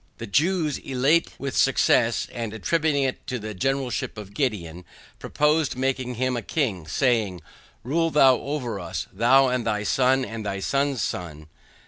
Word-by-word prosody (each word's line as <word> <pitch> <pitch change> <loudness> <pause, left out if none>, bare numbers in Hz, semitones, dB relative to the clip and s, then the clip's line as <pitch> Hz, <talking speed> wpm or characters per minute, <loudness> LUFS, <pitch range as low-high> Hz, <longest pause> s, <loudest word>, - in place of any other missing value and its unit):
The 115 - -6
Jews 155 - +1
elate 135 +6 +2
with 140 -2 -4
success, - - +3
and 115 -2 -4
attributing 150 +4 +1
it 130 -1 -3
to 130 - -2
the 110 -1 -6
generalship 135 +3 -2
of 100 -1 -9
Gideon, 90 - -2 0.4
proposed 150 -1 +1
making 130 -1 -2
him 130 +1 0
a 120 - -2
king, 110 - -2
saying, 110 - +1 0.4
RULE 165 +7 +1
THOU 135 -5 +5
OVER 125 -8 -3
US, 85 -1 -4
THOU 130 +6 +4
AND 125 -2 -1
THY 105 -1 0
SON 130 +4 +2
AND 115 -2 -6
THY 100 -1 -3
SON'S 140 +4 0
SON. 75 -4 -5
125 Hz, 155 wpm, -24 LUFS, 105-140 Hz, 0.4 s, THOU